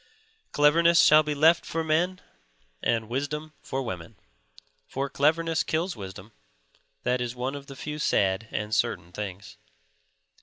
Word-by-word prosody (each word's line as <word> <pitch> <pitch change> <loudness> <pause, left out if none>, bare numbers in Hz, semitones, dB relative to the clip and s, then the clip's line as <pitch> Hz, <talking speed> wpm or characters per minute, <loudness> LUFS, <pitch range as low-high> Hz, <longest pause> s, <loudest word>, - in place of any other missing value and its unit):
Cleverness 165 +3 +5
shall 155 +1 +7
be 150 -1 -3
left 160 +3 +5
for 165 0 -3
men 175 +4 0 0.6
and 115 -1 0
wisdom 145 +5 -3
for 135 0 -3
women. 95 -2 -6 0.7
For 135 +1 -3
cleverness 160 +3 +2
kills 170 +4 -1
wisdom; 95 0 -9 0.7
that 125 0 0
is 120 0 -3
one 125 +2 -3
of 140 -1 -8
the 135 - -9
few 150 +3 -6
sad 100 -6 +1
and 105 0 -3
certain 85 -3 0
things. 100 0 -7
140 Hz, 140 wpm, -27 LUFS, 110-155 Hz, 0.7 s, shall